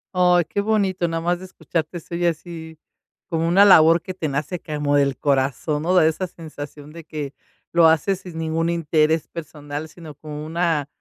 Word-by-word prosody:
Ay, 180 -1 +4
qué 200 - -2
bonito, 200 -4 +1
nada 165 0 -2
más 175 +1 0
de 185 - -9
escucharte 170 -2 -4
estoy 170 +1 -2
así, 160 -1 -5 0.5
como 165 -1 0
una 190 +4 +6
labor 165 -3 +7
que 185 - -7
te 175 -4 -3
nace 150 +5 -3
como 150 -2 -1
del 140 -2 +2
corazón, 140 +2 0
¿no? 180 +3 +1
Da 175 -3 +6
esa 160 +4 0
sensación 150 -3 -10
de 165 0 -10
que 150 -3 -6 0.4
lo 170 -1 +6
haces 165 +4 +2
sin 180 -4 -10
ningún 165 +1 -1
interés 160 -1 +1
personal, 150 -1 -7
sino 160 -1 -11
como 150 +1 -8
una, 165 -3 0
165 Hz, 180 wpm, -22 LUFS, 150-175 Hz, 0.5 s, labor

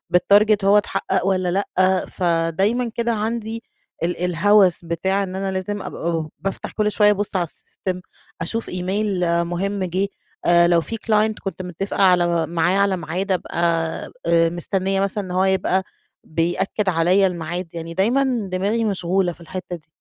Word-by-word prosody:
بالtarget 205 +3 +4
هو 200 +1 +6
اتحقق 190 -2 0
والَّا 185 -2 +1
لأ، 185 -1 +1
فدايمًا 180 +7 +1
كده 235 0 0
عندي 225 +1 -3 0.4
ال 175 +1 -1
الهوس 185 0 +3
بتاع 190 +4 0
إن 185 -1 -5
أنا 195 0 -2
لازم 190 +2 -3
أبقى 170 -2 -4
ب 155 - -8
بافتح 195 0 -4
كل 210 -1 0
شوية 210 0 +5
أبُص 205 0 -1
على 180 - +2
السيستم 180 +2 -6 0.4
أشوف 225 +7 -2
إيميل 190 +2 -1 0.2
مهم 190 +3 -2
جِه 185 +2 0 0.4
آآ 170 0 +5
لو 170 -1 +4
في 225 - -5
client 215 -1 +1
كنت 195 -1 -4
متفقة 185 +3 -3
على 175 -3 +3
معاه 170 +3 +1
على 200 -1 +2
ميعاد 180 +4 -3
أبقى 180 -2 -2 0.7
آآ 165 0 +4
مستنية 190 +3 -1
مثلًا 200 +1 -1
إن 185 - -7
هو 185 +1 +2
يبقى 190 0 +1 0.4
بيأكد 175 +5 -1
عليَّ 180 +3 +3
الميعاد، 175 0 -4
يعني 165 0 -6
دايمًا 235 +2 +1
دماغي 205 +5 0
مشغولة 185 -2 0
في 170 - -19
الحتة 180 +1 -6
دي. 155 -3 -15
190 Hz, 160 wpm, -21 LUFS, 175-205 Hz, 0.7 s, هو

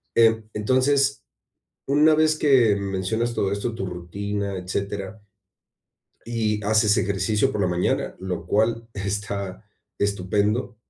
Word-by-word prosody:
eh, 115 -1 +4
entonces, 130 +5 +2 0.6
una 150 +3 +5
vez 155 0 +3
que 125 -9 +4
mencionas 100 +4 -2
todo 100 0 0
esto, 105 +3 -2
tu 95 -4 -4
rutina, 100 +3 -4
etcétera, 100 +2 -4 1.0
y 110 -3 -1
haces 110 0 +3
ejercicio 105 +5 +1
por 105 - -2
la 95 - +2
mañana, 90 0 0
lo 95 -2 -4
cual 115 +2 +1
está 100 -1 -4 0.3
estupendo, 105 +4 0
105 Hz, 115 wpm, -24 LUFS, 100-115 Hz, 1.0 s, una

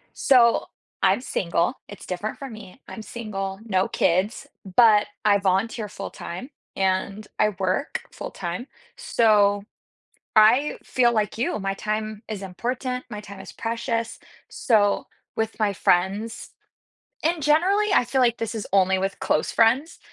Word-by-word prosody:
So, 240 -3 +4 0.4
I'm - - +4
single. 175 -5 0 0.2
It's 205 - -10
different 195 +4 -4
for 275 - -6
me, 215 -2 -11
I'm 220 - -8
single, 195 -4 -5
no 190 -3 +1
kids, 190 +10 0 0.3
but 220 -4 +6 0.2
I 205 -1 +5
volunteer 205 +3 0
full 195 - -7
time 185 +10 -7 0.3
and 195 +2 -1
I 215 - +4
work 190 +9 -1
full - - -7
time. 180 +7 -5 0.3
So, 210 - +3 0.7
I 230 +7 +5
feel 240 -2 +2
like 215 -2 -1
you, 230 - -1
my 195 0 -2
time 215 +1 -3
is 210 -3 -5
important. 250 +7 -3
My 210 -2 -6
time 200 -2 -11
is - - -10
precious, 230 0 -3 0.3
so, 210 -5 +2 0.3
with 220 0 -2
my 210 -2 +1
friends 200 +5 0 0.7
and 330 +1 +1
generally, 360 +9 +3
I - - +4
feel 265 +2 0
like 240 -2 +3
this 230 0 -3
is 215 - -4
only 190 -1 +4
with 195 +1 -3
close 155 - 0
friends, 255 +8 +2
215 Hz, 145 wpm, -24 LUFS, 195-235 Hz, 0.7 s, but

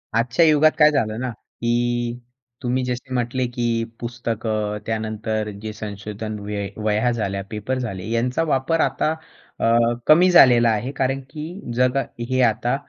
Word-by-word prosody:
आजच्या 120 +8 +3
युगात 155 0 +5
काय 150 -1 +6
झालं 110 -6 0
ना 130 - -2
की 120 +1 -2 0.4
तुम्ही 125 +1 0
जसे 125 +1 -4
म्हटले 125 +1 0
की 120 0 -3 0.3
पुस्तकं 110 -3 -3
त्यानंतर 110 -1 -2
जे 110 -1 -5
संशोधन 105 0 -6
व 100 - -9 0.4
वह्या 110 +3 +2
झाल्या, 100 -4 -2
पेपर 110 +5 -3
झाले 110 -4 -5
यांचा 125 +7 0
वापर 155 +2 +1
आता 155 - +1 0.5
अ, - - 0 0.4
कमी 175 +4 +7
झालेला 120 -9 +7
आहे. 115 +4 -1
कारण 135 -1 -1
की 160 +5 -7
जग 125 +2 +2 0.3
हे 130 0 +2
आता 120 +1 +2
120 Hz, 145 wpm, -22 LUFS, 110-130 Hz, 0.5 s, कमी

